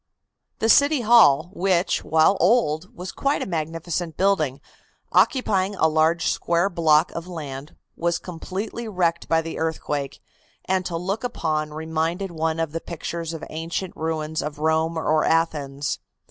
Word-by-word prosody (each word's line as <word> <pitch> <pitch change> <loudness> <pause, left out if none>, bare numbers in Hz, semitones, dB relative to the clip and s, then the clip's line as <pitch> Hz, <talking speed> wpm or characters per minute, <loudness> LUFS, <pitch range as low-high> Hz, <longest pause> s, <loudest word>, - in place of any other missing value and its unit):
"The 225 - 0
City 285 +3 +5
Hall, 210 -9 +5
which, 185 -2 +1
while 160 +5 +4
old, 180 -4 +2
was 180 +1 -6
quite 280 +1 0
a - - -4
magnificent 165 0 -3
building, 160 -9 +1 0.5
occupying 205 -7 +2
a 160 - +3
large 160 +2 +2
square 170 +4 +1
block 160 -2 +3
of 170 +1 -6
land, 145 -5 -7 0.2
was 170 0 0
completely 195 +6 -6
wrecked 175 -5 -1
by 165 0 +3
the 165 - -6
earthquake, 145 -3 -3 0.5
and 190 0 +1
to 170 - -3
look 195 +6 -3
upon 155 -10 -2
reminded 160 +4 -2
one 160 0 -1
of 165 -2 -1
the 165 +1 -4
pictures 170 0 -5
of 165 -1 -7
ancient 165 +4 -4
ruins 160 -1 -2
of 150 -1 -5
Rome 160 +2 +1
or 155 -1 +2
Athens. 145 -4 0
165 Hz, 145 wpm, -23 LUFS, 155-185 Hz, 0.5 s, City